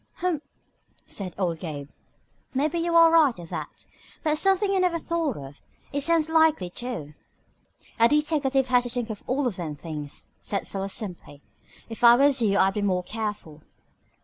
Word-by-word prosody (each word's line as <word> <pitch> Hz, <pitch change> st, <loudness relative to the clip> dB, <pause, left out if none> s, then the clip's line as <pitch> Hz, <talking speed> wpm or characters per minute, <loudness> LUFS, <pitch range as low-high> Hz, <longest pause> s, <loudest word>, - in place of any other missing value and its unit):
"Humph!" 350 Hz, -5 st, -1 dB, 0.6 s
said 185 Hz, -4 st, -7 dB
old 175 Hz, -4 st, -1 dB
Gabe. 145 Hz, -5 st, -6 dB, 0.7 s
"Maybe 305 Hz, +5 st, +1 dB
you 335 Hz, 0 st, 0 dB
are 330 Hz, -1 st, +7 dB
right, 310 Hz, -7 st, +5 dB
at 170 Hz, -2 st, -10 dB
that. 160 Hz, -4 st, -7 dB, 0.4 s
That's 305 Hz, -1 st, +1 dB
something 390 Hz, +1 st, +2 dB
I 390 Hz, -, +2 dB
never 360 Hz, -2 st, +2 dB
thought 330 Hz, -5 st, -2 dB
of. 140 Hz, 0 st, -10 dB, 0.3 s
It 285 Hz, -, 0 dB
sounds 325 Hz, +1 st, +2 dB
likely, 320 Hz, -, +3 dB
too." 220 Hz, -, -5 dB, 0.9 s
"A 230 Hz, +1 st, +6 dB
deteckative 295 Hz, -3 st, +2 dB
has 250 Hz, -1 st, +5 dB
to -, -, -3 dB
think 240 Hz, -2 st, -3 dB
of 210 Hz, -, -7 dB
all 265 Hz, +1 st, +1 dB
them 170 Hz, -6 st, -5 dB
things," 150 Hz, -1 st, -7 dB
said 200 Hz, -, -3 dB
Philo 195 Hz, 0 st, -4 dB
simply. 180 Hz, -8 st, -7 dB, 0.4 s
"If 225 Hz, +1 st, -9 dB
I 235 Hz, 0 st, +9 dB
was 275 Hz, 0 st, +3 dB
you 200 Hz, -3 st, +2 dB
I'd 195 Hz, -1 st, +3 dB
be 210 Hz, -, -2 dB
more 185 Hz, -3 st, 0 dB
careful." 210 Hz, -8 st, -5 dB
240 Hz, 170 wpm, -25 LUFS, -, 0.9 s, I